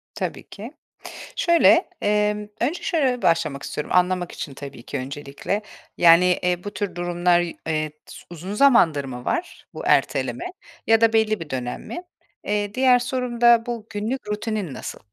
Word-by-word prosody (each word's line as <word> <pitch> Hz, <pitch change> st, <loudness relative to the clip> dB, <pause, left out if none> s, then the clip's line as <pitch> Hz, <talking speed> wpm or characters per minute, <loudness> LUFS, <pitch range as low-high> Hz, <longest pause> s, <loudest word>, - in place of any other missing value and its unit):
Tabii -, -, -5 dB
ki. -, -, -9 dB, 0.7 s
Şöyle, 340 Hz, +1 st, +4 dB
emm, 210 Hz, 0 st, +1 dB
önce 290 Hz, +9 st, -1 dB
şöyle 265 Hz, -8 st, +1 dB
başlamak 155 Hz, -4 st, +1 dB
istiyorum 150 Hz, -, -5 dB
anlamak 180 Hz, -1 st, +2 dB
için 140 Hz, -, -7 dB
tabii 135 Hz, -3 st, -10 dB
ki -, -, -5 dB
öncelikle, 140 Hz, +8 st, -4 dB, 0.4 s
yani, 170 Hz, +1 st, +7 dB, 0.2 s
eee, 180 Hz, 0 st, 0 dB
bu 205 Hz, -, -5 dB
tür 205 Hz, -3 st, -4 dB
durumlar, 175 Hz, 0 st, +2 dB, 0.3 s
eee, 155 Hz, -1 st, -1 dB
s -, -, -12 dB
uzun 175 Hz, +4 st, -7 dB
zamandır 210 Hz, -, +4 dB
mı 125 Hz, -2 st, -8 dB
var 350 Hz, -, -3 dB
bu -, -, -7 dB
erteleme 350 Hz, -, +1 dB, 0.4 s
ya 225 Hz, 0 st, +5 dB
da 225 Hz, 0 st, +4 dB
belli 220 Hz, -2 st, +2 dB
bir 165 Hz, -2 st, -8 dB
dönem 125 Hz, -2 st, -4 dB
mi? 350 Hz, -, -7 dB, 0.4 s
Eee, 205 Hz, 0 st, -1 dB
diğer 255 Hz, -1 st, +4 dB
sorum 250 Hz, -1 st, -3 dB
da 235 Hz, -1 st, +6 dB
bu 230 Hz, -2 st, -5 dB
günlük 220 Hz, +5 st, -4 dB
rutinin 210 Hz, -, -3 dB
nasıl? -, -, -7 dB
205 Hz, 160 wpm, -23 LUFS, 165-235 Hz, 0.7 s, yani